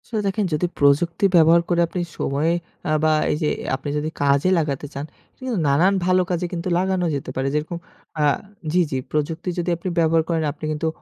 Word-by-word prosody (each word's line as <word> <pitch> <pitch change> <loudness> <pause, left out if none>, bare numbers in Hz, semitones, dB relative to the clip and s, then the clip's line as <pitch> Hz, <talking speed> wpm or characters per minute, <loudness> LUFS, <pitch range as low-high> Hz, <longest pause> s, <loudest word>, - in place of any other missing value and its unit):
আসলে 220 -3 -2
দেখেন 200 +1 0
যদি 155 +4 +1
প্রযুক্তি 155 +6 +3
ব্যবহার 165 0 +6
করে 175 -1 +2
আপনি 180 +2 -3 0.2
সময়ে 150 +5 0 0.3
অ্যা 155 - 0
বা 155 - +4 0.2
এই - - +1
যে 150 - +2 0.3
আপনি 145 - -6
যদি 150 +1 -2
কাজে 140 +4 +3
লাগাতে 145 -3 -1
চান, 140 +1 -4 0.3
এটা - - -41
কিন্তু 250 -3 -1
নানান 165 +8 +4
ভালো 185 0 +4
কাজে 180 0 -1 0.3
লাগানো 185 0 0
যেতে 140 - -5
পারে। 135 +1 -1
যেরকম 155 +3 -2 0.4
আ - - +3 0.5
জি, 180 - +4
জি 135 - 0
প্রযুক্তি 160 +4 -2
যদি 175 +1 -1
আপনি 180 +2 -4
ব্যবহার 165 0 +3
করেন, 165 -2 +1
আপনি 155 - -8
কিন্তু 155 +1 -2
165 Hz, 195 wpm, -22 LUFS, 150-180 Hz, 0.5 s, ব্যবহার